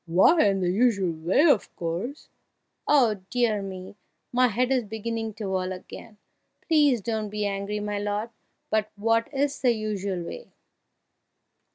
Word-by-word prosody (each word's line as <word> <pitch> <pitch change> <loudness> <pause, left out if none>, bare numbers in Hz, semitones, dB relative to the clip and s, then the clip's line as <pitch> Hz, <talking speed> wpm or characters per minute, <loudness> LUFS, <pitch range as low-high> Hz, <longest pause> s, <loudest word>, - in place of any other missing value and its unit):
why 190 - +5
in 195 -2 +2
the 180 -1 +1
usual 200 -4 +2
way, 165 - +1
of 265 - +2
course!" 175 - -4 0.6
"Oh, 235 -9 +3
dear 235 -4 +1
me! 190 0 -8 0.4
my 250 +1 +4
head 250 +3 0
is 255 -2 +2
beginning 220 +1 -4
to 210 -2 -5
whirl 185 -1 -1
again! 205 +4 -10 0.5
Please 290 - +4
don't 215 0 -2
be 210 0 -2
angry, 200 +1 -2
my 205 0 -3
lord, 205 +3 -2 0.4
but 215 -1 +1
what 225 +3 +1
is 285 0 -1
the 250 -2 +4
usual 200 -4 -3
way?" 485 - -9
210 Hz, 150 wpm, -26 LUFS, 195-240 Hz, 0.6 s, why